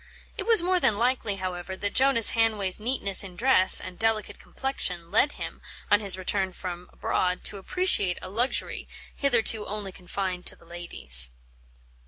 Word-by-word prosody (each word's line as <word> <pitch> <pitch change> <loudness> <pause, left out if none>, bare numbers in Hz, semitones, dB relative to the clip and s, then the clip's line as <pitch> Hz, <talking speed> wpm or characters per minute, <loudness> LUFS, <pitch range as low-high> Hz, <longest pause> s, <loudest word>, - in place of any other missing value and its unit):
It - - -4
was 450 -7 +6
more 365 +1 0
than 215 -11 +1
likely, 235 -3 -1
however, 185 0 -6
that 205 +1 -4
Jonas 265 -4 +4
Hanway's 215 -5 0
neatness 210 -4 +4
in 185 -2 -11
dress 220 -4 +4
and 185 -1 -10
delicate 220 -1 -2
complexion 180 -11 -3
led 280 +8 +2
him, - - -9 0.3
on 205 - +5
his 195 -3 +3
return 185 0 -2
from 180 -1 -8
abroad, 180 0 -2
to 205 - -3
appreciate 200 - -1
a - - -10
luxury 235 +7 -2 0.3
hitherto 230 -5 0
only 205 -2 -6
confined 180 0 -6
to - - -1
the - - -23
ladies. 65 - +4
200 Hz, 160 wpm, -25 LUFS, 180-230 Hz, 0.3 s, was